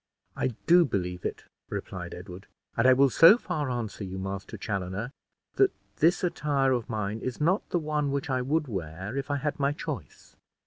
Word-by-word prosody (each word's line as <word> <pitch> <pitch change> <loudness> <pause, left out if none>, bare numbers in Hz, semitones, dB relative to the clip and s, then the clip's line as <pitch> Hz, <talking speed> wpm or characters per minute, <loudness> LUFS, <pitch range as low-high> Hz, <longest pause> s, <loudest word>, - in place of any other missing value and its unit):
"I 125 - -1
do 175 +1 +7
believe 90 - -2
it," - - -3 0.3
replied 90 -2 -5
Edward; 90 +2 -10 0.3
"and 115 +2 +3
I 130 - +8
will 135 +1 +4
so 170 - +8
far 150 - -3
answer 115 -4 -3
you, 95 0 -5
Master 95 0 -5
Chaloner, 100 +3 -3 0.5
that 395 -1 +5 0.3
this 170 +5 +3
attire 145 -6 +1
of 120 -3 -1
mine 105 -1 -2
is 130 0 -4
not 175 +7 +1
the - - +1
one 150 -3 -1
which 140 -1 -2
I 130 -2 0
would 150 +4 0
wear, 95 - -5
if 140 +1 -3
I 145 - +1
had 145 +1 -2
my 140 +1 +2
choice." 145 - -7
130 Hz, 185 wpm, -28 LUFS, 100-150 Hz, 0.5 s, I